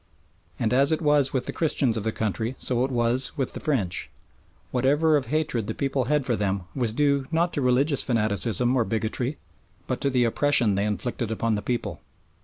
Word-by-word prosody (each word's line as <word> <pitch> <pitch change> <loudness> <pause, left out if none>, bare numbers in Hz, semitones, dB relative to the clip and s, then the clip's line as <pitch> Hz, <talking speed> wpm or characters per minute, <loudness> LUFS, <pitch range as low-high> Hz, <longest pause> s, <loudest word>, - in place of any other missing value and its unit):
And 115 +1 0
as 140 +4 +4
it 160 - +1
was 150 -4 +3
with 130 -2 -2
the - - -4
Christians 140 -7 0
of 110 - -3
the 110 - 0
country 110 +3 -3
so 125 -1 0
it 130 - -1
was 125 +3 +1
with 135 -3 -2
the - - -6
French 105 - -1 0.6
whatever 145 +5 +2
of 140 -4 0
hatred 140 -6 -1
the - - -4
people 135 -2 -1
had 150 0 +1
for 120 -3 +1
them 100 -2 -1
was 120 -5 0
due 140 +2 +1
not 170 +2 +1
to 145 - -1
religious 135 +3 +2
fanaticism 115 +1 +1
or 125 - +3
bigotry 115 +5 -2 0.5
but 130 - -3
to 140 - +1
the 125 -2 +2
oppression 120 -2 +3
they 100 +1 0
inflicted 105 +3 -3
upon 110 0 -1
the 105 - -1
people. 120 +1 -3
125 Hz, 200 wpm, -25 LUFS, 110-140 Hz, 0.6 s, as